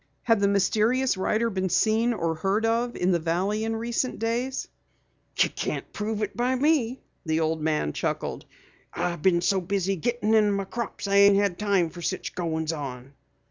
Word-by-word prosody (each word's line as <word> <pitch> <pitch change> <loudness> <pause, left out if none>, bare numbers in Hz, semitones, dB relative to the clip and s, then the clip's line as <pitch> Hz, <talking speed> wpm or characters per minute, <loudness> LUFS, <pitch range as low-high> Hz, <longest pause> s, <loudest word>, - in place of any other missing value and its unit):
Had 225 -3 +3
the 200 - +3
mysterious 215 +6 +2
rider 220 +4 0
been 190 -1 -1
seen 220 +6 +2
or 165 -8 -1
heard 195 +7 0
of 235 +2 0
in 180 +1 +1
the 175 - +2
Valley 185 +6 -1
in 225 0 -1
recent 235 +3 -2
days? 240 +4 -2 0.7
"You - - +3
can't - - -4
prove 215 0 -2
it 205 - -4
by 250 +2 +1
me," 265 -3 +1 0.2
the 160 -2 0
old 160 0 0
man 150 - 0
chuckled. - - -3 0.5
"I 175 -1 -2
been 170 +1 +2
so 190 +1 +2
busy 195 +1 -1
gettin' 225 +4 0
in 210 -2 +4
my 200 0 -1
crops 230 0 -5
I 200 0 +2
ain't 200 0 +7
had 200 -2 0
no 210 - -3
time 180 -5 +2
fer 175 +1 -10
such 185 +2 -3
goins 160 -2 -2
on." 135 -3 -7
200 Hz, 185 wpm, -26 LUFS, 175-225 Hz, 0.7 s, ain't